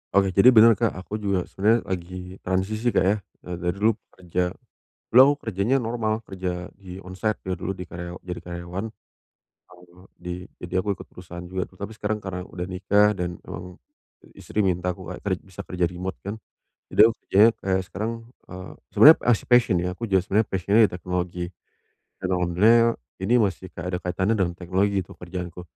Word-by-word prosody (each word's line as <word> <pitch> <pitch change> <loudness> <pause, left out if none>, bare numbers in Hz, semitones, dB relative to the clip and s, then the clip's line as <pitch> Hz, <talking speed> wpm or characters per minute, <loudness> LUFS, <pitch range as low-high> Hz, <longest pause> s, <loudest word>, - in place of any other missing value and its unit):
Oke, 95 -1 +4
jadi 120 +6 +6
bener, 115 +1 +9
Kak, 115 -3 +1
aku 95 +4 -5
juga 100 -3 0
sebenernya 110 +4 +2
lagi 90 0 -6
transisi, 105 +6 -1
Kak, - - +4
ya, 95 +3 +3 0.3
eee, 90 -1 -5
dari 90 +1 -1
dulu 105 +3 +3 0.2
kerja. 90 0 -2 0.7
Dulu 125 - +8
aku 140 +2 +6
kerjanya 110 +5 +1
normal, 115 -2 -2
kerja 90 -2 -4
di 95 -2 -11
on-site 95 +3 -3
ya 95 - -1
dulu, 95 - -3
di 90 - -6
karya 85 +1 -7
jadi 90 -1 -5
karyawan. 85 +3 -5 0.7
Setahun 90 +1 -20
di 90 +1 -7
jadi 90 - -9
aku 100 -1 -2
ikut - - -10
perusahaan 90 0 -10
juga 95 +1 -4
tuh. 95 - -22
Tapi 100 +4 -6
sekarang 105 0 -2
karena 95 -3 -5
udah 90 -1 -5
nikah 100 +3 +3
dan 90 -3 -4
emang 90 0 -8 0.5
i - - -16
istri 105 -1 -1
minta 90 -1 0
aku 90 0 -5
kayak 90 +2 -7
ker 100 - -1
bisa 95 -2 -10
kerja 90 -1 -1
remote 90 +2 -5
kan, 100 - -3 0.6
jadi - - -4
aku - - -3
kerjanya 105 +4 +6
kayak 95 -1 0
sekarang, 110 +4 -3 0.3
eee, 90 0 -9 0.2
sebenarnya 155 +2 +9 0.2
as 110 - 0
a - - -17
passion 120 -5 +5
ya. 90 - -1
Aku 115 - -3
juga 95 -3 +3
sebenernya 105 +4 +1
passion-nya 100 +4 +2
di - - -3
teknologi 90 0 -3 0.7
dan 95 - -3
alhamdulillahnya 110 +7 +4 0.2
ini 105 +6 +2
masih 95 -4 -1
kayak 90 0 -7
ada 90 - 0
kaitannya 95 +4 0
dengan 90 -4 -1
teknologi 95 +1 0
tuh, - - -13
kerjaanku, 90 0 -7
95 Hz, 190 wpm, -24 LUFS, 90-105 Hz, 0.7 s, bener